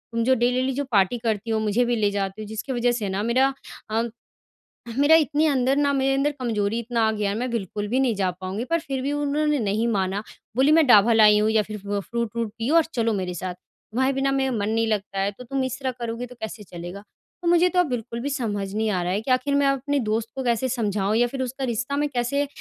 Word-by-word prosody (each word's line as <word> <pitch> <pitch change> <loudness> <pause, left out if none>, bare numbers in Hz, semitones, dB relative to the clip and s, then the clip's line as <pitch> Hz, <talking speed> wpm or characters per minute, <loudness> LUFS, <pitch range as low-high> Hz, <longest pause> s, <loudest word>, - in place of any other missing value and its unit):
तुम 230 - +1
जो 260 +3 +4
डेली-डेली 250 +2 +1
जो 285 - -1
पार्टी 200 +2 +3
करती 225 -2 -2
हो 220 - +1
मुझे 215 +3 +1
भी 240 0 +1
ले 210 -3 +2
जाते 195 +1 -3
हो - - -6
जिसके 220 +5 -4
वजह 245 0 +2
से 225 -5 -2
ना 190 +1 -2
मेरा 260 +4 +2 0.4
अ, 220 +1 +1 1.0
मेरा 290 +3 +6
इतनी 305 0 +3
अंदर 265 -2 +2
ना 285 -1 +3
मेरे 270 0 +2
अंदर 275 +2 +1
कमज़ोरी 225 -3 -1
इतना 235 0 -1
आ - - +2
गया 210 -2 -1
मैं 255 - -2
बिल्कुल 205 -2 -3
भी 250 +5 0
नहीं 255 -4 +2
जा 190 -2 0
पाऊँगी 190 +4 -3
पर 335 - +3
फिर 270 -4 -4
भी 275 +2 -1
उन्होंने 290 0 0
नहीं 215 +1 0
माना 200 -2 -1 0.3
बोली 270 +4 +4
मैं 320 0 +6
दवा 230 -1 +6
लाई 210 -1 +6
हूँ 215 +1 +2
या 220 -1 +3
फिर 215 - -4
फ 200 0 -13 0.2
फ़्रूट 235 -1 -1
व्रूट 230 -2 -1
पियो 240 +8 0
और 330 - +6
चलो 230 -2 +1
मेरे 180 -1 -3
साथ। 180 +1 -4
तुम्हारे 260 +8 -3
बिना 270 0 0
मेरा 270 -1 +1
मन 210 -3 -1
नहीं 225 +1 +1
लगता 205 -2 -2
है 195 +1 +1
तो 205 +5 -12
तुम 265 +2 -2
इस 260 +1 -3
तरह 265 -2 -1
करोगी 235 +1 -4
तो 250 0 -13
कैसे 220 -1 -6
चलेगा? 175 +2 -8 0.4
तो 345 - -3
मुझे 345 +1 +5
तो 360 - +1
अब 360 - +4
बिल्कुल 235 -1 -4
भी 280 - -2
समझ 205 -8 -3
नहीं 220 +1 0
आ 185 -3 0
रहा 175 - -1
है 200 +3 0
कि 255 - -3
आख़िर 255 +3 +2
मैं 280 0 +3
अपनी 275 +1 0
दोस्त 220 +1 -1
को 265 - -3
कैसे 240 +1 +1
समझाऊँ 210 -4 0
या 240 +1 +3
फिर 265 +2 -5
उसका 260 +2 -5
रिश्ता 255 +4 -2
मैं 295 0 0
कैसे 280 +2 0
235 Hz, 250 wpm, -24 LUFS, 210-270 Hz, 1.0 s, मेरा